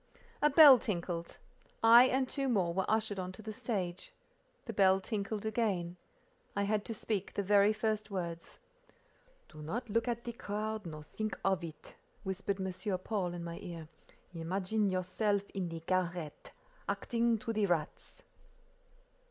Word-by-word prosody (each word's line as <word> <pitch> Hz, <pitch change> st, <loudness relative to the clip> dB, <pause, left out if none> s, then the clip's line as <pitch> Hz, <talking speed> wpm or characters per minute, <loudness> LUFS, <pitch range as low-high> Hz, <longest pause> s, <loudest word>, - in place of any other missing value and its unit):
A 295 Hz, -, +5 dB
bell 285 Hz, -3 st, +9 dB
tinkled. 170 Hz, -4 st, -4 dB, 0.5 s
I 235 Hz, +2 st, +9 dB
and 260 Hz, 0 st, +1 dB
two 275 Hz, 0 st, -1 dB
more 185 Hz, -8 st, +1 dB
were 190 Hz, +1 st, -1 dB
ushered 215 Hz, -2 st, +1 dB
on 185 Hz, 0 st, -4 dB
to 220 Hz, -, -11 dB
the 215 Hz, 0 st, -5 dB
stage. 185 Hz, -6 st, -3 dB, 0.5 s
The 225 Hz, -, -5 dB
bell 190 Hz, -1 st, +5 dB
tinkled 205 Hz, +1 st, -3 dB
again. 205 Hz, -6 st, -1 dB, 0.6 s
I 200 Hz, -, +1 dB
had 205 Hz, 0 st, 0 dB
to 225 Hz, -, -4 dB
speak 205 Hz, -2 st, -3 dB
the 200 Hz, -, 0 dB
very 200 Hz, +1 st, +5 dB
first 215 Hz, -1 st, -1 dB
words. 170 Hz, -4 st, -5 dB, 0.9 s
"Do 155 Hz, -, -12 dB
not 215 Hz, -, -4 dB
look 230 Hz, +3 st, +1 dB
at 235 Hz, -1 st, -2 dB
the 235 Hz, -, -5 dB
crowd, 215 Hz, -2 st, -4 dB
nor 155 Hz, -2 st, -7 dB
think 215 Hz, +7 st, -4 dB
of 190 Hz, -3 st, +2 dB
it," 155 Hz, -2 st, -9 dB, 0.3 s
whispered 195 Hz, 0 st, -2 dB
M. 190 Hz, +1 st, -2 dB
Paul 185 Hz, -2 st, -2 dB
in 170 Hz, -, -5 dB
my 170 Hz, 0 st, -6 dB
ear. 165 Hz, -3 st, -8 dB, 0.4 s
"Imagine 190 Hz, +5 st, 0 dB
yourself 195 Hz, +2 st, 0 dB
in 185 Hz, -3 st, -3 dB
the 165 Hz, 0 st, -6 dB
garret, 175 Hz, -3 st, -2 dB, 0.4 s
acting 235 Hz, -1 st, +1 dB
to 225 Hz, +1 st, -4 dB
the 210 Hz, -2 st, +1 dB
rats." 165 Hz, -4 st, -3 dB
200 Hz, 155 wpm, -33 LUFS, 175-220 Hz, 0.9 s, bell